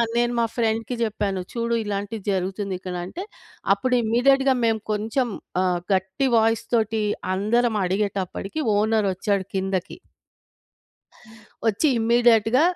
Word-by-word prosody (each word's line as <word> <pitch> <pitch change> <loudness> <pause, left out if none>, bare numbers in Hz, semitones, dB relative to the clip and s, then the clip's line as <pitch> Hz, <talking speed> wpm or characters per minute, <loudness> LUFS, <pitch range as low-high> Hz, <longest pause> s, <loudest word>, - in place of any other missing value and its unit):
నేను 240 0 +2
మా 230 - +3
ఫ్రెండ్‌కి 225 +1 0
జెప్పాను. 205 -4 -1
చూడు 235 0 -1
ఇలాంటిది 205 0 -4
జరుగుతుంది 190 +1 -2
ఇక్కడంటే, 180 - -5 0.5
అప్పుడు 255 -1 0
ఇమ్మీడియేట్‌గా 265 +4 +3
మేము 225 -2 +1
కొంచెం 225 +5 0 0.4
ఆహ్, 180 -1 +1
గట్టి 190 +8 0
వాయిస్ 225 0 +2
తోటి 220 -1 +1 0.3
అందరం 220 +3 +1
అడిగేటప్పడికి, 195 - -2 0.2
ఓనర్ 215 -1 +2
ఒచ్చాడు 195 0 -1
కిందకి. 190 -1 -2 1.7
ఒచ్చి 225 +9 +2
ఇమ్మీడియేట్‌గా 235 +1 +4
220 Hz, 110 wpm, -23 LUFS, 195-235 Hz, 1.7 s, ఇమ్మీడియేట్‌గా